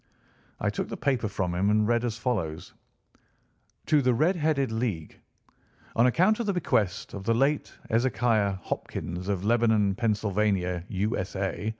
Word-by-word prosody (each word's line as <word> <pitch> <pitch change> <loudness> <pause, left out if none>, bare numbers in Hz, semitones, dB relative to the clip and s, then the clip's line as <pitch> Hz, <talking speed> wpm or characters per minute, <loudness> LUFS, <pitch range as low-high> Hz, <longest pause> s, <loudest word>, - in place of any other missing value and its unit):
I - - 0
took - - -4
the - - -5
paper 130 -6 0
from 95 -3 -2
him 95 +3 +1
and 105 0 +3
read 120 0 +2
as 120 -2 -2
follows: 95 -11 -3 1.1
"TO 150 -2 +3
THE 125 -2 +2
RED 160 +10 +2
HEADED 150 -6 +1
LEAGUE: 110 -9 -3 0.8
On 115 +2 +5
account 185 - +3
of 235 - -2
the 200 - +1
bequest 105 - 0
of 100 - -6
the 115 +1 +2
late 140 +4 +1 0.2
Ezekiah 115 -3 +2
Hopkins, 90 +3 -4
of 100 -1 -1
Lebanon, 110 -3 +3
Pennsylvania, 100 -5 0
U.S.A. 100 0 -2
110 Hz, 150 wpm, -27 LUFS, 100-125 Hz, 1.1 s, On